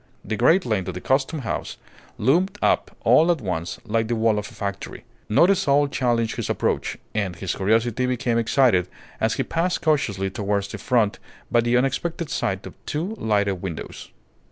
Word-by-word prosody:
The 110 - -2
great 165 - +4
length 105 -5 -1
of 95 - -4
the - - -4
Custom 135 - 0
House 115 - -4 0.4
loomed 180 - +2
up - - +2
all 165 +3 +5
at 170 - 0
once 90 -6 -4
like 115 0 0
the 120 - 0
wall 110 -1 +2
of 105 - -6
a - - -15
factory. 100 0 -5 0.3
Not 170 - +5
a - - +4
soul 145 -4 +2
challenged 120 -4 0
his - - -3
approach, - - -1 0.2
and 100 -4 -1
his 90 +2 -3
curiosity 115 +5 +1
became 120 -2 0
excited 115 -6 +3 0.3
as - - +1
he - - 0
passed 175 +2 -1
cautiously 110 - +1
towards 100 0 -1
the - - -7
front 115 -5 +1 0.3
by 120 - +4
the 120 +1 +2
unexpected 145 +5 -1
sight 95 -1 -2
of - - -8
two 170 +8 -2
lighted 100 -4 0
windows. 90 -5 -6
115 Hz, 180 wpm, -23 LUFS, 100-140 Hz, 0.4 s, all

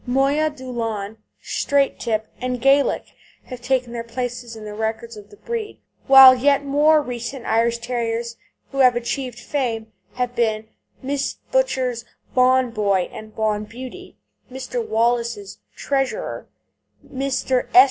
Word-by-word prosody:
Moya 275 +5 +2
Doolan, 230 -6 -5 0.3
Straight 280 -1 0
Tip, 220 -1 -1
and 250 0 -2
Gaelic 275 +3 +2 0.3
have 250 -2 -9
taken 250 -1 0
their 235 -1 -4
places 240 0 -5
in 220 -1 -9
the 210 - -7
records 225 +2 -3
of 205 -1 -12
the 205 - -16
breed, 455 - -5 0.3
while 265 -1 +10
yet 280 +2 +2
more 300 +2 +4
recent 245 0 -6
Irish 230 +1 +2
Terriers 235 -1 -3 0.4
who 275 - -4
have 255 -2 +6
achieved 240 0 -3
fame 230 -5 -3 0.2
have 245 -1 -2
been 220 -2 0 0.4
Mrs. 280 0 -2 0.2
Butcher's 260 - 0 0.3
Bawn 255 -1 +4
Boy 200 -4 0
and 215 0 -10
Bawn 215 -1 0
Beauty, 250 +3 -10 0.3
Mr. 265 - -4
Wallace's 230 - -1 0.2
Treasurer, 275 - -2 0.6
Mr. 265 -1 -1
S. - - +11
245 Hz, 135 wpm, -21 LUFS, 230-270 Hz, 0.6 s, S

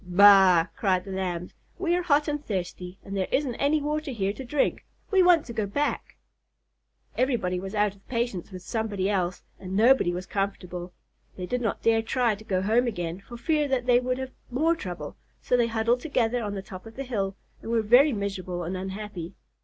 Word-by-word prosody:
"Baa!" 185 -2 +7
cried 185 -3 +1
the 195 - -7
Lambs. 180 -2 -3 0.2
"We 350 -2 +1
are 360 - +1
hot 300 -3 +2
and 295 -1 -2
thirsty 180 -4 -4
and 195 - -6
there 190 -1 0
isn't 270 -3 +1
any 290 +2 +2
water 300 +1 -2
here 200 -6 -1
to 265 - -8
drink. 275 +3 0 0.3
We 385 -2 +5
want 355 -3 +5
to 235 - -7
go 215 -3 -1
back." 285 +9 -2 1.0
Everybody 235 -9 +1
was 195 +3 -6
out 205 -1 +2
of 195 -1 -24
patience 235 -7 -2
with 185 -1 -8
somebody 205 -3 -1
else, 180 -2 -1 0.2
and 185 0 -6
nobody 235 -4 +5
was 180 +1 -4
comfortable. 180 -3 -3 0.5
They 180 - -4
did 250 +6 -2
not 225 - -2
dare 225 0 +4
try 235 0 +1
to 210 +1 -9
go 185 -3 -1
home 230 +5 +3
again, 175 -5 -3
for 240 +4 -11
fear 300 +4 +1
they 245 0 +3
would 255 0 -1
have 260 0 -5 0.2
more 315 +7 +2
trouble, 175 - -7 0.2
so - - +1
they 240 -1 +3
huddled 230 +2 +1
together 245 -4 0
on 205 -2 -3
the 195 - -5
top 185 +2 -10
of 225 - -12
the 275 - -4
hill 200 -7 -2 0.3
and - - -8
were 230 -1 +2
very 250 +7 +6
miserable 190 -5 -3
and 175 +3 -3
unhappy. 190 -2 -6
215 Hz, 200 wpm, -26 LUFS, 185-250 Hz, 1.0 s, Baa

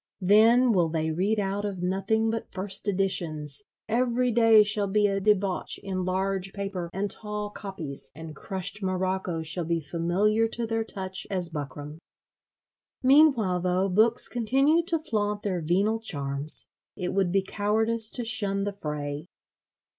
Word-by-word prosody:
Then 225 +6 +4
will 175 -6 +1
they 160 0 -2
read 195 +7 -1
out 200 0 -3
of 195 -3 -5
nothing 195 +5 0
but 225 - -6
first 195 +1 +2
editions; 175 -5 +1 0.2
every 245 +2 0
day 225 -2 +5
shall 205 -1 +2
be 210 +2 +1
a 195 -1 0
debauch 195 -2 0
in 185 -2 -4
large 190 +1 -2
paper 195 -4 -5
and 195 +2 -3
tall 210 -1 -2
copies; 170 -10 -7
and 160 0 -10
crushed 195 +2 -2
morocco 185 -3 -2
shall 165 +3 +1
be 165 +1 -1
familiar 175 +8 0
to 235 +1 -3
their 225 0 -2
touch 190 -3 -3
as 180 -3 -1
buckram. 145 0 -7 1.0
Meanwhile, 260 -9 +4
though, 185 +2 0
books 220 +5 +2
continue 270 +8 +1
to 335 - +2
flaunt 210 -8 -3
their 185 -4 -2
venal 195 +8 0
charms; 140 -7 +3 0.3
it 180 - -3
would 190 -2 0
be 195 +1 +1
cowardice 220 +3 +1
to 240 0 0
shun 205 -4 +3
the 205 0 -3
fray. 150 -3 -5
195 Hz, 150 wpm, -26 LUFS, 180-220 Hz, 1.0 s, day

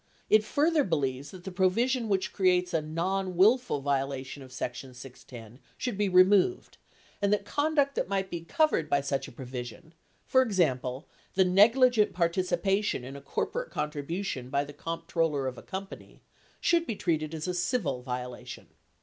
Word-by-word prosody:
It 215 0 +6
further 300 +6 +2
believes 140 - -1
that 185 -2 -11
the 190 - -6
provision 225 +7 +1
which 190 -2 0
creates 180 -2 +2
a 165 - +2
"nonwillful" 185 - +1
violation 135 0 -2
of 130 -1 -12
section 130 0 -6
610 125 -2 -12 0.2
should 245 -3 -3
be 205 0 0
removed 190 - +3 0.4
and 200 0 +2
that 205 -1 +1
conduct 290 0 +1
that 195 - -2
might 195 -1 -1
be 170 - -4
covered 170 - +1
by 140 - +2
such 135 -1 -2
a - - -11
provision, 125 +5 -8 0.3
for 260 - +4
example, 140 - 0 0.3
the 190 0 +5
negligent 220 +4 +5
participation 185 -1 0
in 135 +2 -8
a 140 - -9
corporate - - -3
contribution 150 -2 -4
by 140 +1 +1
the 145 0 -10
comptroller 165 -2 -2
of 130 -1 -4
a - - -11
company, 195 +1 -8 0.4
should 340 -1 +2
be 225 - -2
treated 160 -4 -1
as 155 +2 -4
a 180 - -1
civil 175 - -1
violation. 125 -1 -6
175 Hz, 160 wpm, -29 LUFS, 140-200 Hz, 0.4 s, It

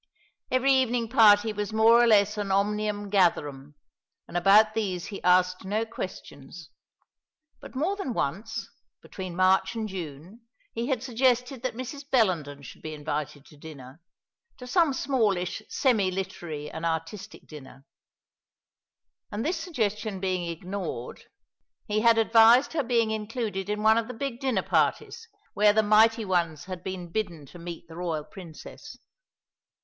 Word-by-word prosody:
Every 260 +2 +3
evening 245 -3 +1
party 215 -1 +5
was 210 0 -4
more 225 +2 +5
or 240 - +4
less 210 -1 +4
an 205 -2 -3
omnium 205 +1 -1
gatherum; 150 -7 0 0.5
and - - -12
about 205 +4 +5
these 190 -6 -2
he 200 - -7
asked 180 0 +3
no 210 +4 -1
questions 170 -7 -9 0.9
but - - -13
more 325 +9 0
than 390 -10 -4
once, 200 +11 -3 0.4
between 185 -3 -7
March 190 +1 +2
and 220 -1 -3
June, 180 - -8 0.3
he 230 +1 -3
had 260 -4 -1
suggested 250 0 0
that 255 -2 -3
Mrs. 255 +3 -7
Bellenden 165 - 0
should - - -12
be 155 0 -6
invited 145 -1 -5
to 150 - -18
dinner 145 -1 -12 0.6
to 250 - -10
some 330 +3 +2
smallish 220 -9 0
semi 220 -8 +2
literary 175 -5 -5
and 160 - -7
artistic 165 +4 -4
dinner 135 -2 -13 1.5
and 210 +4 -3
this 340 +3 0
suggestion 215 - -3
being 185 -2 -2
ignored, 170 -6 -6 0.6
he 210 0 0
had 230 +1 +4
advised 225 +5 +5
her 315 - +1
being 230 -3 +1
included 215 -3 -4
in 210 0 -2
one 220 +1 +5
of 225 - -4
the 250 - -7
big 255 -1 -4
dinner 265 -3 0
parties, 455 - -1 0.3
where 210 +1 +4
the 220 +1 +3
mighty 220 +2 +4
ones 170 -5 -1
had 185 -2 -7
been 185 -3 -6
bidden 175 -7 -3
to 175 +6 -14
meet 170 0 -8
the 165 - -12
royal 165 -4 -3
Princess. 170 -3 -12
205 Hz, 150 wpm, -26 LUFS, 175-230 Hz, 1.5 s, party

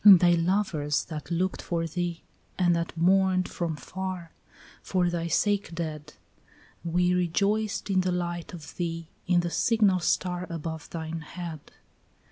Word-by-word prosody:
And 200 -3 +11
thy 175 0 +5
lovers 170 -4 +1
that 155 -2 -6
looked 180 +2 0
for 170 -1 -1
thee, 170 +1 -3 0.3
and 175 -2 +4
that 170 0 -3
mourned 185 +1 +4
from 170 -3 -2
far, 180 +3 -5 0.5
For 180 -2 +1
thy 170 -1 -1
sake 200 -1 +1
dead, 155 -3 -5 0.7
We 180 +1 +2
rejoiced 200 +4 +1
in 190 -2 +3
the 185 0 0
light 175 -1 -2
of 160 -4 -10
thee, 165 -2 -3 0.2
in 180 -1 +4
the 175 0 -3
signal 210 -4 +3
star 180 +1 0
Above 160 -2 -5
thine 165 0 -4
head. 165 0 -6
175 Hz, 145 wpm, -28 LUFS, 165-185 Hz, 0.7 s, And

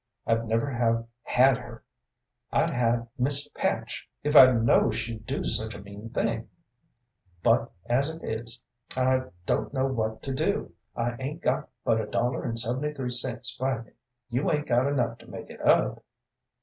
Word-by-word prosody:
I'd 115 0 +1
never 115 +5 +1
have 115 -2 +1 0.2
had 130 0 +4
her; 120 -2 -11 0.7
I'd - - +2
had 120 -1 +1
Miss 140 +3 +1
Patch, - - -2
if 150 +1 0
I'd 130 -4 +9
know 115 0 +5
she'd 110 0 -4
do - - -2
such 110 +1 0
a - - -8
mean 100 +3 -9
thing, - - -1 0.9
but, - - +3
as 130 +5 +2
it 160 +1 -8
is, 115 +2 -4 0.3
I 130 0 +2 0.2
don't - - 0
know 130 0 +2
what 110 -4 -2
to 135 - -3
do. 130 - -1 0.2
I 120 0 -1
'ain't 145 +5 -5
got - - 0 0.2
but 110 0 +3
a 105 - -5
dollar 120 +4 0
and 115 - -2
seventy 125 +6 +1
three 130 -4 -4
cents 125 -1 +1
by 130 -1 0
me. 115 - -16 0.4
You 130 +9 +1
'ain't 150 -1 0
got 125 +3 +2
enough 120 -5 0
to - - -16
make - - -8
it - - -11
up?" - - +3
120 Hz, 175 wpm, -27 LUFS, 115-130 Hz, 0.9 s, I'd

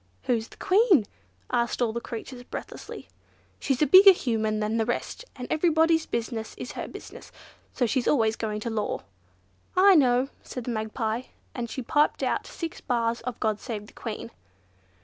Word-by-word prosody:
"Who's 230 -2 0
the - - -17
Queen?" 385 - +4 0.5
asked 235 0 0
all 235 -3 +1
the 235 - -3
creatures 245 +2 -7
breathlessly. 245 - -8 0.5
"She's 270 +1 +1
a - - +5
bigger 385 +4 +9
Human 220 -8 -1
than 215 +1 0
the 225 - +1
rest, 240 - -3
and 250 -2 -6
everybody's 320 0 +3
business 230 -1 -3
is - - -6
her - - -5
business, - - -11 0.4
so 250 - 0
she's 245 +2 0
always 225 -6 +3
going 215 -2 -3
to 230 - -3
law." 215 -1 -2 0.8
"I 390 +1 +8
know," 260 -4 +4
said 250 - -7
the 245 - -3
Magpie, 220 +2 -2 0.3
and 235 -2 -4
she 260 - -5
piped 295 +5 +2
out - - -1
six 330 -2 -6
bars 235 -2 0
of 245 -1 -5
"God 215 -1 0
save 215 -4 -5
the - - -17
Queen." 230 0 -6
240 Hz, 170 wpm, -26 LUFS, 225-285 Hz, 0.8 s, bigger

